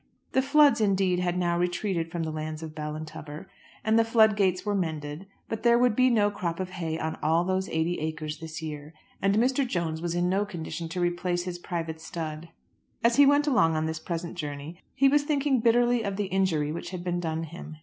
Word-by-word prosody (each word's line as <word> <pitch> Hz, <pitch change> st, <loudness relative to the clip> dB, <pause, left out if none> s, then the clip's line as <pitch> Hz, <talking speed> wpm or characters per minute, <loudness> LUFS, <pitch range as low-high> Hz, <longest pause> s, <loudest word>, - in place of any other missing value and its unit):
The 265 Hz, -, +3 dB
floods, 285 Hz, -2 st, +5 dB
indeed, 190 Hz, -3 st, +2 dB
had 180 Hz, 0 st, 0 dB
now 175 Hz, -1 st, +1 dB
retreated 175 Hz, -1 st, -1 dB
from 170 Hz, -1 st, -2 dB
the 160 Hz, -, -3 dB
lands 155 Hz, 0 st, -5 dB
of 155 Hz, -1 st, -7 dB
Ballintubber 155 Hz, 0 st, -6 dB, 0.4 s
and 220 Hz, +1 st, +3 dB
the -, -, +5 dB
flood 220 Hz, -2 st, +4 dB
gates 190 Hz, -2 st, +1 dB
were 205 Hz, -, 0 dB
mended; 160 Hz, -2 st, -3 dB, 0.2 s
but 225 Hz, -, -4 dB
there 235 Hz, 0 st, +5 dB
would 245 Hz, -2 st, +3 dB
be 255 Hz, +1 st, +4 dB
no 210 Hz, -4 st, +3 dB
crop 170 Hz, -4 st, -3 dB
of 185 Hz, -1 st, -3 dB
hay 165 Hz, -3 st, -3 dB
on 160 Hz, 0 st, -3 dB
all 165 Hz, +3 st, +3 dB
those 190 Hz, +1 st, -1 dB
eighty 160 Hz, +2 st, 0 dB
acres 155 Hz, -1 st, -4 dB
this 160 Hz, -1 st, -7 dB
year, 150 Hz, 0 st, -7 dB, 0.3 s
and 195 Hz, +1 st, +2 dB
Mr. 255 Hz, +5 st, +2 dB
Jones 170 Hz, -9 st, -2 dB
was 175 Hz, 0 st, -2 dB
in 175 Hz, 0 st, +1 dB
no 195 Hz, +3 st, +2 dB
condition 170 Hz, -4 st, -6 dB
to 180 Hz, +2 st, -4 dB
replace 175 Hz, 0 st, 0 dB
his 175 Hz, -1 st, -5 dB
private 165 Hz, -2 st, -4 dB
stud. 160 Hz, 0 st, -6 dB, 0.5 s
As 235 Hz, 0 st, +3 dB
he 285 Hz, -1 st, +8 dB
went 285 Hz, +1 st, +4 dB
along 205 Hz, -, +3 dB
on 155 Hz, 0 st, 0 dB
this 160 Hz, 0 st, -3 dB
present 170 Hz, +1 st, -4 dB
journey 145 Hz, +2 st, -6 dB, 0.2 s
he 275 Hz, -, +5 dB
was 290 Hz, +2 st, +4 dB
thinking 285 Hz, -2 st, +1 dB
bitterly 240 Hz, +1 st, +3 dB
of 200 Hz, -3 st, -3 dB
the 205 Hz, +1 st, -1 dB
injury 165 Hz, -6 st, +1 dB
which 165 Hz, -, -5 dB
had 180 Hz, -2 st, -6 dB
been 175 Hz, -1 st, -1 dB
done 160 Hz, -1 st, -2 dB
him. 160 Hz, -1 st, -9 dB
175 Hz, 215 wpm, -27 LUFS, 160-210 Hz, 0.5 s, he